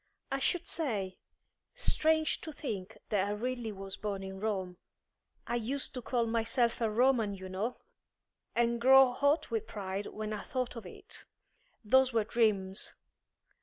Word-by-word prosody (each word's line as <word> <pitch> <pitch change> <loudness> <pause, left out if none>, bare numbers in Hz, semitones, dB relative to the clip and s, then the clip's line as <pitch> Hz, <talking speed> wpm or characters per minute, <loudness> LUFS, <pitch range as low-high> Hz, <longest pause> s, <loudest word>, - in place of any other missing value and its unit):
I 270 - 0
should 345 +5 0
say? 205 - -1 0.6
Strange 315 -10 +2
to 315 - -6
think 220 -9 -5
that 200 -2 +2
I 205 - -1
really 240 +1 -3
was 195 -1 -7
born 200 -2 -3
in 190 0 -6
Rome. 190 -4 -2 0.7
I 240 - 0
used 260 +4 -3
to 250 - -4
call 240 0 0
myself 230 +1 +1
a 225 - +2
Roman, 225 -2 +3
you 190 -1 -8
know, 200 +6 -3 0.8
and 235 0 +2
grow 265 0 +8
hot 285 +5 +2
with 445 -1 -1
pride 195 -1 -4
when 215 0 -4
I 210 - -3
thought 255 +1 -3
of 225 -5 -7
it. 390 - -9 0.6
Those 260 +3 +5
were 225 -2 +3
dreams. 205 -4 +1
230 Hz, 155 wpm, -32 LUFS, 200-260 Hz, 0.8 s, grow